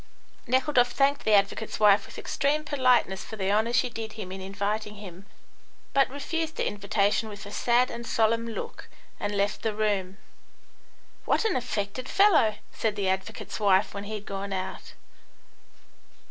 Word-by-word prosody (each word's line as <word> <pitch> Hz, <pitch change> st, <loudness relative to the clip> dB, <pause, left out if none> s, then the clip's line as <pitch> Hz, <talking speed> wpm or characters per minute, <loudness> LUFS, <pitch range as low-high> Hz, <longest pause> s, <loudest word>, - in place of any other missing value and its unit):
Nekhludoff 255 Hz, -1 st, +3 dB
thanked 280 Hz, +1 st, +2 dB
the 215 Hz, -, +5 dB
advocate's 200 Hz, +2 st, 0 dB
wife 210 Hz, -1 st, +5 dB
with -, -, -12 dB
extreme 300 Hz, +2 st, 0 dB
politeness 255 Hz, -9 st, +2 dB
for 220 Hz, -, -8 dB
the 195 Hz, -2 st, -1 dB
honour 220 Hz, +3 st, +2 dB
she 245 Hz, +1 st, +2 dB
did 225 Hz, -2 st, -6 dB
him 205 Hz, -4 st, -7 dB
in 190 Hz, 0 st, -6 dB
inviting 205 Hz, +2 st, -3 dB
him, 195 Hz, -1 st, -11 dB, 0.7 s
but 275 Hz, -1 st, +4 dB
refused 320 Hz, +4 st, -3 dB
the -, -, -1 dB
invitation 205 Hz, +1 st, 0 dB
with 205 Hz, 0 st, -9 dB
a 205 Hz, -, -9 dB
sad 240 Hz, +3 st, +2 dB
and 235 Hz, 0 st, -7 dB
solemn 230 Hz, +1 st, +2 dB
look, 225 Hz, -, -7 dB, 0.3 s
and 205 Hz, 0 st, -2 dB
left 200 Hz, +1 st, 0 dB
the 220 Hz, -2 st, -1 dB
room. 200 Hz, -3 st, -1 dB, 1.1 s
"What -, -, +1 dB
an 440 Hz, -, +1 dB
affected 230 Hz, -1 st, -3 dB
fellow!" 335 Hz, -, +4 dB, 0.2 s
said 220 Hz, -2 st, -1 dB
the 200 Hz, -2 st, 0 dB
advocate's 190 Hz, +3 st, -3 dB
wife, 200 Hz, -1 st, +3 dB
when 200 Hz, 0 st, -6 dB
he 215 Hz, +1 st, -4 dB
had 210 Hz, -1 st, -7 dB
gone 195 Hz, 0 st, -5 dB
out. 185 Hz, 0 st, -5 dB
215 Hz, 160 wpm, -27 LUFS, 200-245 Hz, 1.1 s, the